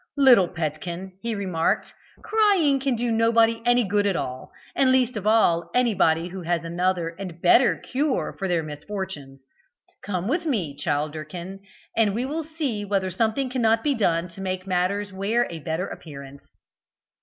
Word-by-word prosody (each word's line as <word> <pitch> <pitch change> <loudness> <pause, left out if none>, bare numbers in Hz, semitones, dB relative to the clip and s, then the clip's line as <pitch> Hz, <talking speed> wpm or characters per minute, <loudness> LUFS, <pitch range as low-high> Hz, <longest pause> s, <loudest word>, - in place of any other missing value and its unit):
"Little 250 -9 +6
petkin," 170 +3 -4
he 230 -1 -2
remarked, 185 -5 -1 0.3
"crying 400 -10 +3
can 265 -2 0
do 235 +1 -1
nobody 230 0 +3
any 245 0 +4
good 205 0 +1
at 195 - +1
all, 130 -5 -5 0.2
and 265 -1 +4
least 255 -2 +2
of 210 -1 -3
all 170 -7 +3
anyone 190 -10 +3
who 190 0 -6
has 170 -1 -1
another 175 0 0
and 180 -4 -7
better 210 +8 +5
cure 275 +1 -2
for 195 - -1
their 175 -3 0
misfortunes. 150 -3 -7 0.6
Come 185 -2 -3
with 330 +6 -1
me, 185 - -1
Childerkin, 155 +5 -4 0.4
and 210 -3 +2
we 240 +3 -1
will 310 +4 -3
see 295 -9 -3
whether 195 -2 -1
something 225 +7 0
cannot 225 -3 +2
be 295 - +2
done 175 -8 +1
to 170 +3 -11
make 185 -1 -3
matters 190 +2 -1
wear 215 +5 +1
a 165 - -6
better 160 +4 -2
appearance." 140 -3 -10
195 Hz, 160 wpm, -24 LUFS, 170-235 Hz, 0.6 s, Little